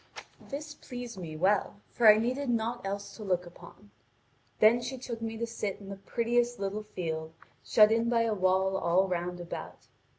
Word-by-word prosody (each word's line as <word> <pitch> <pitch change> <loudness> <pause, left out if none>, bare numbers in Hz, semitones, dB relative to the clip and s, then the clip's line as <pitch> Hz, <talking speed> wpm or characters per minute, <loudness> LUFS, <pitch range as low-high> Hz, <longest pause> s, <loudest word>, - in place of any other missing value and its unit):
This 295 +1 -5
pleased 245 -7 -8
me 160 -3 -6
well, 200 +3 +1
for 235 - +3
I 210 - +4
needed 250 +5 -1
naught 235 +1 -1
else 200 +1 -4
to 220 - -8
look 180 -3 0
upon. 170 - -15 0.7
Then 230 +3 +5
she 255 +2 -4
took 240 -2 -6
me 225 0 -4
to 235 - -1
sit 210 -3 -3
down - - -14
in 195 - -10
the 200 - -5
prettiest 240 +1 0
little 200 +2 -3
field, 160 -6 -5 0.3
shut 215 0 +6
in 230 +1 +2
by 230 -1 +3
a 225 -1 +1
wall 190 0 +2
all 185 +2 +2
round 180 0 -3
about. 175 -1 -7
210 Hz, 190 wpm, -30 LUFS, 185-235 Hz, 0.7 s, shut